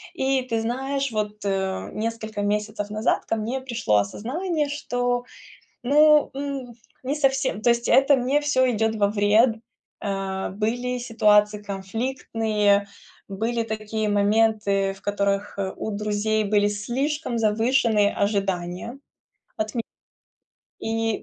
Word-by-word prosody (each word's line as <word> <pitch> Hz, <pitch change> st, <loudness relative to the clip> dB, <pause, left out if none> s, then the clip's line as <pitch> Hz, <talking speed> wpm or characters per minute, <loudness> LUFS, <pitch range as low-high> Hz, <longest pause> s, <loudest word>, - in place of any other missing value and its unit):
И 265 Hz, -3 st, +1 dB
ты 230 Hz, -3 st, -2 dB
знаешь, 270 Hz, +3 st, -2 dB
вот, 210 Hz, -1 st, -3 dB
э, 190 Hz, -1 st, -1 dB
несколько 220 Hz, -1 st, -3 dB
месяцев 210 Hz, 0 st, -2 dB
назад 215 Hz, +1 st, 0 dB
ко -, -, -1 dB
мне 230 Hz, +5 st, -3 dB
пришло 235 Hz, -, 0 dB
осознание, 295 Hz, -, -1 dB
что, 245 Hz, -4 st, -1 dB, 0.6 s
ну, 300 Hz, +3 st, +5 dB
м 275 Hz, -2 st, -4 dB
жас -, -, -28 dB, 0.3 s
не 270 Hz, +3 st, -1 dB
совсем, 270 Hz, -6 st, 0 dB
то 240 Hz, -, +4 dB
есть 235 Hz, 0 st, +1 dB
это 275 Hz, +1 st, +5 dB
мне 265 Hz, +4 st, +1 dB
всё 260 Hz, -3 st, +2 dB
идет 220 Hz, -1 st, 0 dB
во 205 Hz, -1 st, +3 dB
вред. 215 Hz, +3 st, +3 dB, 0.5 s
Э, 195 Hz, -1 st, -2 dB
были 240 Hz, +5 st, -2 dB
ситуации 210 Hz, -3 st, +3 dB
конфликтные, 210 Hz, 0 st, 0 dB, 0.4 s
были 225 Hz, +4 st, -1 dB
такие 215 Hz, 0 st, -3 dB
моменты, 205 Hz, -1 st, +2 dB
в 195 Hz, -, -18 dB
которых, 200 Hz, 0 st, -1 dB
э, 190 Hz, -1 st, -2 dB
у -, -, -4 dB
друзей 215 Hz, +1 st, 0 dB
были 205 Hz, 0 st, +2 dB
слишком 255 Hz, +6 st, -2 dB
завышенные 220 Hz, -1 st, +2 dB
ожидания 195 Hz, +2 st, -2 dB, 0.6 s
от 215 Hz, +2 st, -3 dB
ме 230 Hz, -, 0 dB, 1.0 s
И 225 Hz, -1 st, -1 dB
220 Hz, 125 wpm, -24 LUFS, 205-250 Hz, 1.0 s, ну